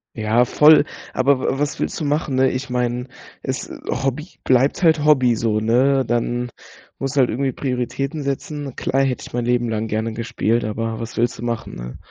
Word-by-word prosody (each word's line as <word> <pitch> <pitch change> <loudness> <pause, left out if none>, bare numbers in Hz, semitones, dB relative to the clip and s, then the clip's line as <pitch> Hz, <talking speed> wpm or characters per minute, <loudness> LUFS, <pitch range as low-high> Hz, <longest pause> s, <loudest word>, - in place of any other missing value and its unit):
Ja, 110 +2 +2
voll, 150 +3 +6 0.3
aber 135 +1 +3
wa 135 - -1
was 145 0 -1
willst - - -2
du - - -1
machen, 145 -2 0
ne? 130 0 +3
Ich 130 +1 -4
meine, 125 0 -1 0.4
es - - -3 0.2
Hobby 135 +5 -1 0.2
bleibt 130 +7 +2
halt 160 -2 +4
Hobby 130 -6 +4
so, 110 -2 0
ne? 130 +4 +3
Dann 120 +1 -1 0.5
muss 135 0 -2
du 140 - +4
halt 125 - +3
irgendwie 130 +2 -1
Prioritäten 135 +3 -3
setzen. 140 0 -4
Klar, 135 +1 +1
hätte 130 -2 -2
ich - - -12
mein 120 -1 -1
Leben 120 -1 +1
lang 110 0 -2
gerne 110 +1 -2
gespielt, 115 0 -1
aber 110 +1 -3
was 115 0 -6
willst 120 +1 0
du - - -6
machen, 115 -1 -3
ne? - - -7
125 Hz, 195 wpm, -21 LUFS, 115-135 Hz, 0.5 s, voll